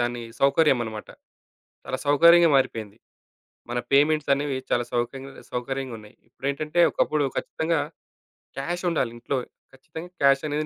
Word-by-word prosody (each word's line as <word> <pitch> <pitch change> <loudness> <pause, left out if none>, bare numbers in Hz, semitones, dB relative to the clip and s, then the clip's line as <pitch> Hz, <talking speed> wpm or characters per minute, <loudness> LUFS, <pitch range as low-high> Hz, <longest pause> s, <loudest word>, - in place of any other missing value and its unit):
దాని 120 0 -1 0.2
సౌకర్యమన్నమాట. 135 -7 +2 0.8
చాలా - - -3
సౌకర్యంగా 170 +3 +6
మారిపోయింది. 110 -6 -1 0.7
మన 120 - -1
పేమెంట్సనేవి 145 -1 +2
చాలా 120 - +1
సౌక్యంగా 135 +3 -3 0.2
సౌకర్యంగున్నాయి. 125 -4 -5
ఇప్పుడేంటంటే, 140 +6 -2
ఒకప్పుడు 150 -1 +1
ఖచ్చితంగా 165 +1 -1 0.8
క్యాషుండాలి 170 -3 -1
ఇంట్లో. 135 +3 -2 0.4
ఖచ్చితంగా 160 +6 -10
క్యాషనేది 145 +2 +2
140 Hz, 95 wpm, -25 LUFS, 120-155 Hz, 0.8 s, సౌకర్యంగా